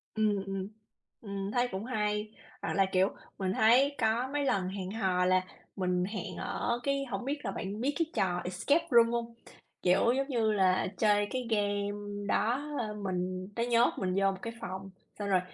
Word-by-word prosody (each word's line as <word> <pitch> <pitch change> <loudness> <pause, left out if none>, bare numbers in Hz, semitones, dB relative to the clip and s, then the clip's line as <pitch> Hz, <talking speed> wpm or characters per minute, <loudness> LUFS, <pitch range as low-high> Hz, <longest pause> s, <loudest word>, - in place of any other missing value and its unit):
Ừm, 210 -2 +2
ừm. 195 -1 -3 0.5
Ừm, 200 -2 -4
thấy 245 +2 +2
cũng 190 +3 -4
hay. 210 -3 -1 0.3
Hoặc - - -2
là, 195 - +4
kiểu, 190 +1 +4 0.3
mình 190 -1 -1
thấy 250 +7 +5
có 230 +2 +2
mấy 290 -1 0
lần 195 -8 +1
hẹn 190 -1 -5
hò 190 -4 +1
là 185 0 +4 0.3
mình 180 -2 0
hẹn 200 -2 -5
ở 240 0 -1
cái 275 0 0
hổng 215 -3 -4
biết 290 +2 -1
là 195 - -1
bạn 200 +3 -4
biết 280 +4 +1
cái 330 - +3
trò 180 -2 +1
Escape 280 - +1
Room 235 -1 +6
hông? 235 0 -2 0.5
Kiểu 185 +6 +4
giống 275 0 0
như 230 -5 +1
là 190 -3 +3
chơi 205 -1 +3
cái 255 -2 -2
game 205 -1 -1
đó, 235 +6 +1 0.2
ơ, 215 -2 -2
mình 185 -2 -3
nó 235 - 0
nhốt 235 0 +4
mình 185 -1 -1
vô 195 0 +3
một 190 - -6
cái 230 - -5
phòng, 190 +1 -5 0.3
xong 205 -1 -2
rồi 190 -2 +4
205 Hz, 195 wpm, -31 LUFS, 190-235 Hz, 0.5 s, Room